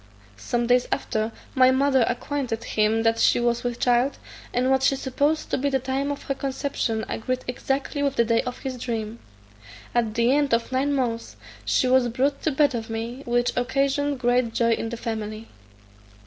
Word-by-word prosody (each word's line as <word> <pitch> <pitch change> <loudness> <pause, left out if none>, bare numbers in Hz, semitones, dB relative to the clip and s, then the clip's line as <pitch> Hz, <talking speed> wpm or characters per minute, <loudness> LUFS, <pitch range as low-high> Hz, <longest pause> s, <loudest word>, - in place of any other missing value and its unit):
Some 235 - -1
days 245 +1 +3
after, 220 -4 -1 0.2
my 255 -1 +6
mother 265 -1 +3
acquainted 245 -2 -3
him 220 +1 +1
that 225 0 +2
she - - +4
was 240 0 0
with 245 -1 -3
child, 245 +3 +2 0.3
and 255 +2 +1
what 265 0 +3
she 275 - +3
supposed 285 +4 -1
to - - +1
be 285 +2 +1
the 270 - +2
time 265 +2 -2
of 285 - -6
her 275 - -1
conception 265 -4 -2
agreed 255 +3 -2
exactly 270 +3 -2
with 280 -1 0
the 235 - +3
day 230 0 +2
of 250 0 -5
his 260 -2 -5
dream. 230 -2 -4 0.7
At 230 -3 0
the 235 +1 +3
end 285 -5 +3
of 230 +2 -3
nine 265 +2 +1
months 235 -4 -2 0.3
she 255 - +2
was 255 -1 +4
brought 270 +4 0
to 315 - 0
bed 285 0 +3
of 225 -2 -4
me; 230 +3 -4
which 240 0 +1
occasioned 275 +3 0
great 245 -2 +1
joy 230 -1 +2
in 225 0 -1
the 235 - -5
family. 220 -1 -5
250 Hz, 190 wpm, -24 LUFS, 230-270 Hz, 0.7 s, my